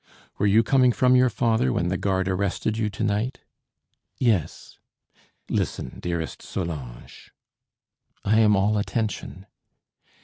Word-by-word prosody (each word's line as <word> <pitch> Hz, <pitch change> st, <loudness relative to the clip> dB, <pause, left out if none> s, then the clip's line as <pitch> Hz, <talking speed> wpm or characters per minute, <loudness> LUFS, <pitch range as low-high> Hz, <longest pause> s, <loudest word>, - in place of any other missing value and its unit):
"Were 105 Hz, -, +2 dB
you 110 Hz, +3 st, +5 dB
coming 130 Hz, +2 st, +4 dB
from 130 Hz, -1 st, +3 dB
your 125 Hz, 0 st, +5 dB
father 110 Hz, -, +1 dB
when 85 Hz, +7 st, 0 dB
the 95 Hz, -, -1 dB
guard 95 Hz, -1 st, 0 dB
arrested 100 Hz, +3 st, -1 dB
you 110 Hz, -1 st, -1 dB
to 105 Hz, +2 st, -5 dB
night?" 110 Hz, +5 st, -1 dB, 0.8 s
"Yes." 110 Hz, -, -1 dB, 0.7 s
"Listen, 65 Hz, -, -3 dB
dearest 85 Hz, -2 st, -4 dB
Solange." 75 Hz, -10 st, -7 dB, 0.9 s
"I 110 Hz, +2 st, +3 dB
am 105 Hz, -2 st, +5 dB
all 105 Hz, +2 st, +2 dB
attention." 105 Hz, -3 st, -3 dB
105 Hz, 125 wpm, -24 LUFS, 95-115 Hz, 0.9 s, you